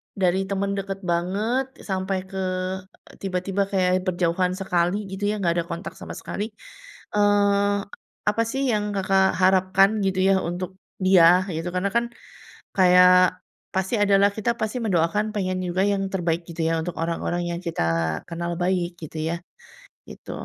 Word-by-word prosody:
dari 185 -1 +2
teman 200 0 -1
dekat 195 0 -5
banget 205 +10 0 0.2
sampai 190 0 -1
ke 190 0 -5 0.8
tiba-tiba 190 +1 -2
kayak 185 -1 +2
berjauhan 180 0 +1
sekali, 180 -1 0 0.2
gitu, 195 +1 -6
ya, - - -1
nggak 170 - +2
ada 165 - -2
kontak 170 +2 -6
sama - - -8
sekali, 205 - -5 0.7
eee, 205 -1 +3 0.5
apa, 210 +2 +1
sih, 270 +1 -1
yang 210 -1 +1
Kakak 190 0 +2
harapkan, 190 +1 +4 0.2
gitu, 190 -1 0
ya, 195 - +5 0.2
untuk 185 +1 -5 0.3
dia, 180 -1 +6
gitu? 165 +2 -3
Karena, 185 +2 0
kan, 235 +3 +1 0.7
kayak 180 -1 +6 0.4
pasti 190 +5 0
ada, 200 -1 +4
lah, 200 0 +5
kita 215 +2 +1
pasti 220 +3 -2
mendoakan, 185 +1 +1
pengen 185 -2 -1
juga 185 +2 0
yang 200 -1 +1
terbaik, 170 -2 0
gitu, 165 0 -5
ya, 165 - +1
untuk 175 - -5
orang-orang 170 +1 -2
yang 170 - -3
kita 170 -2 -3 0.5
kenal 170 0 -3
baik, 175 -1 -1
gitu, 160 0 -8
ya, 170 - -1 0.8
gitu. - - -11
185 Hz, 155 wpm, -24 LUFS, 175-200 Hz, 0.8 s, dia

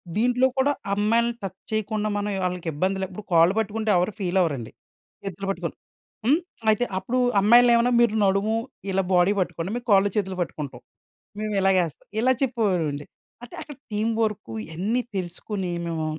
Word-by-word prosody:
దీంట్లో 250 +3 +3
కూడా 275 +2 +3 0.2
అమ్మాయిల్ని 230 +3 +2
టచ్ 190 -1 -5
చేయకుండా. 215 0 -1
మనం 205 0 -2
వాళ్ళకి 180 -2 -2
ఇబ్బంది 190 +5 0
లే - - 0
ఇప్పుడు 200 +2 -9
కాళ్ళు 165 +3 +6
పట్టుకుంటే 220 +1 -2
ఎవరు 180 +4 +1
ఫీలవ్వరండి. 175 - 0 0.5
చేతులు 195 0 -5
పట్టుకొని 195 - -3 0.5
హ్మ్. 295 +7 +4 0.3
అయితే 215 +3 +3
అప్పుడు 240 +7 -1 0.2
అమ్మాయిల్ని 240 +3 +7
ఏమన్నా 240 +1 +3
మీరు 220 -2 +3
నడుము 200 +3 +2 0.4
ఇలా 190 0 +1
బాడీ 180 +3 +4
బట్టుకోండి. 180 +1 -2
మేము 245 0 -6
కాళ్ళు, 200 +1 +5
చేతులు 190 -3 -1
పట్టుకుంటాం. 150 -5 -5 0.6
మేము 215 -1 -2
ఇలాగేస్తాం. 185 -5 +1
ఇలా 260 +2 +4
చెప్పేవారండి. 180 - 0 0.4
అంటే 240 - -11
అక్కడ 295 -4 -10 0.2
టీమ్ 220 +2 0
వర్క్ 210 - -2
ఇయన్నీ 195 +10 -1 0.2
తెలుసుకొని 185 +1 -4 0.2
మేము 160 -2 -2
200 Hz, 150 wpm, -24 LUFS, 180-225 Hz, 0.6 s, అమ్మాయిల్ని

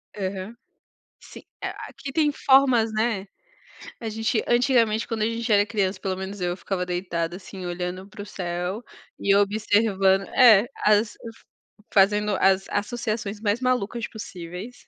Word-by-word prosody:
Aham, 195 +2 -4 0.7
sim, - - -13 0.2
é - - -2 0.2
aqui 275 - -8
tem 300 +1 +2
formas, 265 -5 +4
né, 215 -3 0 0.7
a 225 - -4
gente 225 +1 -1
antigamente 240 -3 +2
quando 225 -2 -3
a - - +3
gente 230 0 -3
era 205 -1 +5
criança, 200 -3 -1
pelo 190 -1 -3
menos 190 +2 -6
eu, 175 0 -1
ficava 185 -2 -3
deitada 175 -1 -3
assim 190 -1 -9
olhando 180 +2 -4
para 205 - -10
o - - -7
céu, 180 +3 -4 0.4
e 200 0 +3
observando, 200 -2 +2
é, 235 -4 +6 0.2
as 210 0 +3 0.8
fazendo 205 +1 +3
as 195 0 +4
associações 215 -1 -3
mais 215 +2 0
malucas 240 -3 -1
possíveis. 185 +2 -9
205 Hz, 140 wpm, -24 LUFS, 190-230 Hz, 0.8 s, é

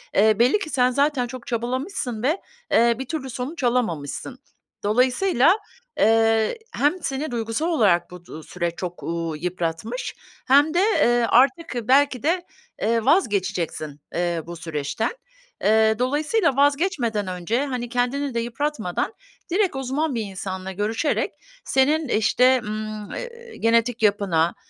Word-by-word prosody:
eee, 215 +1 +4
belli 250 - +4
ki 335 - -5
sen 255 -3 +2
zaten 280 -1 +1
çok 255 0 -9
çabalamışsın 245 - -3
ve, 310 +9 +1 0.3
eee, 235 0 +4
bir 265 - -4
türlü 270 -1 -4
sonuç 260 +5 -5
alamamışsın. 240 - -1 0.4
Dolayısıyla, 255 - +3 0.4
eee, 225 - +3 0.2
hem 290 +3 +2
seni 275 +2 -3
duygusal 230 +6 -2
olarak 210 - +2
bu 180 -1 -11
du 160 -2 -9
süreç 175 0 -3
çok, 175 0 -6
uuu, 165 -1 -3
yıpratmış 175 - -3 0.3
hem 285 +4 +5
de, 345 - +2
eee, 240 - +3
artık 280 +5 +3
belki 270 -2 +3
de, 350 +4 +1 0.4
eee, 230 0 +1
vazgeçeceksin, 185 - 0 0.2
eee, 170 -1 0
bu 170 +1 -7
süreçten. 165 +5 -3 0.5
Eee, 220 +1 +4
dolayısıyla 295 - +1
vazgeçmeden 275 - +1
önce, 185 +9 -1
hani, 250 -3 -4
kendini 255 +3 -1
de 235 - 0
yıpratmadan 235 - -2 0.4
direkt 380 -3 +1
uzman 270 +2 -1
bir 230 - -1
insanla 190 -1 -5
görüşerek 215 - -1 0.3
senin, 295 +4 +2
işte, 250 +4 +3
ımm, 215 0 -5
eee, 470 -1 -8
genetik 230 +1 +2
yapına, 195 -6 +2
240 Hz, 135 wpm, -23 LUFS, 205-280 Hz, 0.5 s, hem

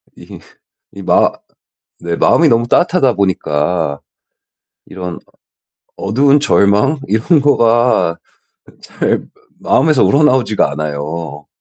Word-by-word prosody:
이게 - - -13 0.5
이 - - -11
마 - - +2 0.7
네 85 -1 -4
마음이 165 - +3
너무 120 -2 +1
따뜻하다 170 -4 +2
보니까 80 -5 -2 0.9
이런 90 -2 -7 0.8
어두운 135 +8 +2
절망 105 +3 +2
이런 120 - +1
거가 120 -9 +2 0.7
잘 - - -2 0.4
마음에서 155 -4 +2
우러나오지가 130 - +2
않아요. 75 0 -6
105 Hz, 215 characters per minute, -14 LUFS, 85-140 Hz, 0.9 s, 마음이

